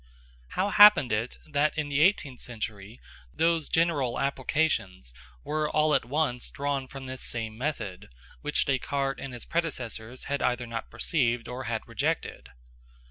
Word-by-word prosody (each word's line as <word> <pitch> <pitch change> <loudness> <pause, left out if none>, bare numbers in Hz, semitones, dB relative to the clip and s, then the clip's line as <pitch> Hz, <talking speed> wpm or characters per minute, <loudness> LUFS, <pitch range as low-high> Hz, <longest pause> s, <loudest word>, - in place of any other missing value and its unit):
How 190 +2 +2
happened 205 - +8
it 110 +3 -1
that 150 +1 +1
in 150 -1 -1
the 145 0 +1
eighteenth 150 -8 +3
century 110 -2 -6 0.3
those 165 - +1
general 155 -7 +1
applications 130 - 0 0.3
were 155 0 -1
all 155 0 +3
at - - +3
once 130 -2 0
drawn 140 -1 -2
from 135 0 -8
this 130 0 -6
same 110 -2 -2
method, 110 - -4 0.3
which 150 0 +1
Descartes 135 0 -1
and 135 - -5
his 120 -2 -8
predecessors 125 -7 -3
had 140 0 -2
either 125 0 +1
not 115 -1 -5
perceived 120 -7 0
or 125 +1 -5
had 115 -2 -3
rejected? - - -2
135 Hz, 145 wpm, -28 LUFS, 120-150 Hz, 0.3 s, happened